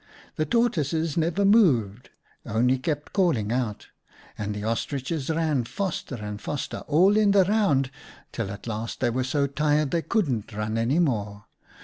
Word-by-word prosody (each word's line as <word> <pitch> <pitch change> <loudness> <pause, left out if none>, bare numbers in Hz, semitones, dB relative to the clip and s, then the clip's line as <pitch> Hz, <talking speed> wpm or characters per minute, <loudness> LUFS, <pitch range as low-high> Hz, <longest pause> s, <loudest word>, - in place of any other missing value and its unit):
The 155 - -1
Tortoises 165 - +1
never 170 +4 +1
moved, 125 - +3 0.3
only 125 +4 +1
kept 150 +1 -3
calling 155 - +1
out. 120 -4 -2 0.5
And 105 -1 -4
the 105 - -5
Ostriches 130 +6 -2
ran 160 -5 +1
faster 145 - -4
and 105 -2 -6
faster, 145 - -4
all 180 +7 +4
in 210 -2 +4
the 195 -1 +6
round, 175 -11 +2 0.4
till 115 -4 -3
at 100 - -8
last 115 0 -4
they 120 -2 +1
were 130 +2 -1
so 140 +2 0
tired 150 +1 +1
they 170 - +1
couldn't 130 - -1
run 105 +1 -3
any 120 +7 +1
more. 105 -10 -1
140 Hz, 155 wpm, -25 LUFS, 115-165 Hz, 0.5 s, the